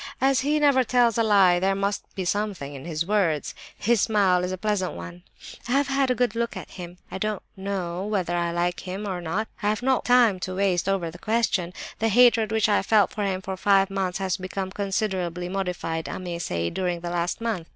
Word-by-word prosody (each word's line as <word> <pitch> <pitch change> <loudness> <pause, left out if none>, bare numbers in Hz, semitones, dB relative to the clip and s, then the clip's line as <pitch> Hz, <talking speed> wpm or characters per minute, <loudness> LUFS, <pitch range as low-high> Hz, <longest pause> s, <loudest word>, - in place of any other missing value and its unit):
As 270 0 +3
he 290 +4 +1
never 285 -3 +4
tells 240 -1 +3
a - - +5
lie, 195 -5 +5
there 195 +1 +1
must 200 +1 -1
be 190 - -3
something 195 -7 -2
in 135 +1 -9
his 165 -1 -2
words. 180 -7 0 0.2
His 230 -1 +2
smile 190 -4 +3
is 180 - -2
a 185 - -3
pleasant 200 -1 -1
one. 85 +1 -9 0.5
I 245 - -1
have 280 0 +2
had 270 -1 +1
a 250 - +2
good 245 -3 +1
look 235 0 -2
at - - -9
him. 175 -1 -9
I 190 - -5
don't 215 0 -2
know 190 -2 -3
whether 185 -5 -1
I 170 0 0
like 175 +1 -1
him 195 +3 -5
or 185 -2 -3
not; 190 +7 -2
and 205 - 0
I - - +4
have 215 +3 -1
no 260 0 +3
time 240 -6 +4
to 185 0 -4
waste 190 -1 +1
over 180 -4 -1
the 175 - -12
question. 215 -5 0 0.3
The 225 - +2
hatred 230 -1 +5
which 220 -1 +2
I 205 - +3
felt 205 0 +3
for 210 - -3
him 190 -1 -2
for 190 0 -4
five 195 0 +3
months 190 -2 -1
has 190 -1 -1
become 190 0 -4
considerably 190 -3 -2
modified, 180 -4 -3
I - - -4
may 175 -2 -5
say, 85 - -2
during 180 -2 -2
the 175 0 -4
last 175 0 -1
month. 225 -8 -3
195 Hz, 225 wpm, -25 LUFS, 175-215 Hz, 0.5 s, a